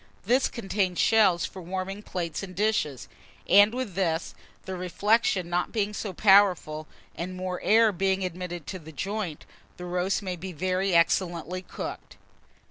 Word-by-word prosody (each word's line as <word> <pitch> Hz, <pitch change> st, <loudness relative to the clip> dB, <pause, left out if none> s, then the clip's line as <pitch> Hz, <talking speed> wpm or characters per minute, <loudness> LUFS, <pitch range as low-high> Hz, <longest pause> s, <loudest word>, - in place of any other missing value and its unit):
This 250 Hz, +6 st, +3 dB
contains 195 Hz, -5 st, -2 dB
shelves 200 Hz, -6 st, +4 dB
for 190 Hz, -, -8 dB
warming 190 Hz, +3 st, -4 dB
plates 170 Hz, -6 st, -4 dB
and 185 Hz, -2 st, -8 dB
dishes; 195 Hz, -, 0 dB, 0.4 s
and 205 Hz, +3 st, +7 dB
with 250 Hz, -5 st, -4 dB
this, 170 Hz, -3 st, -1 dB, 0.3 s
the 190 Hz, -, -4 dB
reflection 185 Hz, +1 st, +1 dB
not 175 Hz, +1 st, -1 dB
being 210 Hz, -2 st, -1 dB
so 210 Hz, -1 st, -4 dB
powerful, 185 Hz, -6 st, +4 dB, 0.3 s
and 180 Hz, +2 st, -5 dB
more 185 Hz, -1 st, -4 dB
air 225 Hz, 0 st, +5 dB
being 190 Hz, 0 st, 0 dB
admitted 175 Hz, -2 st, -5 dB
to 185 Hz, -, -6 dB
the 160 Hz, -1 st, -12 dB
joint, 185 Hz, +2 st, -4 dB, 0.3 s
the 180 Hz, -, -7 dB
roast 180 Hz, +3 st, -1 dB
may 185 Hz, -2 st, -3 dB
be 180 Hz, +2 st, -7 dB
very 185 Hz, +3 st, 0 dB
excellently 170 Hz, +1 st, +1 dB
cooked. -, -, -8 dB
185 Hz, 150 wpm, -27 LUFS, 175-200 Hz, 0.4 s, and